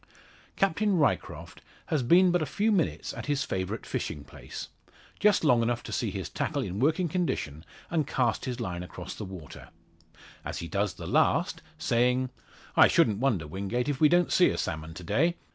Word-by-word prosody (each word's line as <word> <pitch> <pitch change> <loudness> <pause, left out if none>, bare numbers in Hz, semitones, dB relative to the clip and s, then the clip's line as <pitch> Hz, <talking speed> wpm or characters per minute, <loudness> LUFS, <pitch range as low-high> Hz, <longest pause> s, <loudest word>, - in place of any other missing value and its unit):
Captain 195 +1 +2
Ryecroft 150 - -1 0.2
has 155 -4 0
been 175 +9 +5
but 175 -1 +2
a - - +1
few 210 +11 +1
minutes 185 -6 0
at - - -7
his 145 -1 +1
favourite 95 +4 -3
fishing 75 - -4
place - - -9 0.5
just 210 -3 +4
long 125 -6 +4
enough 120 0 0
to - - -8
see - - -1
his - - -4
tackle - - -2
in 95 +3 -4
working 160 +7 +2
condition, 145 - -2 0.3
and 160 -4 +1
cast 120 -2 0
his 125 -3 -4
line 90 -1 -3
across 90 - -7
the 105 - -6
water; 90 -6 -10 0.7
as - - -5
he 85 - -5
does 100 +1 -1
the - - -8
last, - - +2 0.2
saying 125 +2 +1 0.4
"I - - +8
shouldn't 105 -2 +3
wonder, 115 - +1
Wingate, 100 +10 -2
if 140 0 -2
we 150 - +7
don't 175 +2 +3
see 180 - +5
a - - -2
salmon 80 -2 -4
to 90 - -8
day. 165 - +2
125 Hz, 185 wpm, -28 LUFS, -, 0.7 s, I